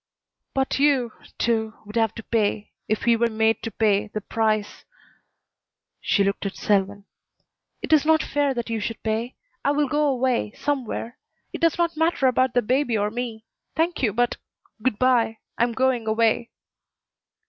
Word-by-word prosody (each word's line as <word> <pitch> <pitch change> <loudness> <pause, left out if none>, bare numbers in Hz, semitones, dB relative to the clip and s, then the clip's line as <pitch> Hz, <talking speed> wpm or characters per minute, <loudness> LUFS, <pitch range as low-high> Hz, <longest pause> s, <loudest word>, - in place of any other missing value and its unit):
"But 270 0 0
you, 275 -5 +3 0.3
too, 220 -1 0
would 210 +2 -10
have 225 -2 +1
to 225 - -7
pay 210 -2 -1 0.2
if 215 - -1
he 235 0 +4
were 235 +1 +1
made 220 0 +1
to - - -4
pay 210 -1 +1
the 215 - -4
price." 215 0 -1 1.2
She 200 - +2
looked 200 0 -1
at 195 - -6
Selwyn. 200 0 0 0.8
"It - - 0
is 305 - +6
not 315 0 +3
fair 285 -2 0
that 235 -1 -3
you 225 - -1
should 225 +2 -5
pay. 225 +3 -2 0.3
I - - +2
will 290 0 +2
go 295 +2 +1
away 255 -5 0
somewhere. 255 -4 -3 0.3
It - - -6
does 330 -1 +3
not 340 -1 +1
matter 320 -3 +1
about 255 -1 +2
the 245 - +3
baby 250 0 +1
or 205 0 0
me. 230 -2 -5 0.3
Thank 330 +1 0
you, 230 -5 +2
but 240 +4 0 0.4
Good 240 -2 0
by. 240 -3 +2 0.2
I'm 235 0 +3
going 255 -2 0
away." 225 +1 +2
235 Hz, 170 wpm, -24 LUFS, 220-265 Hz, 1.2 s, is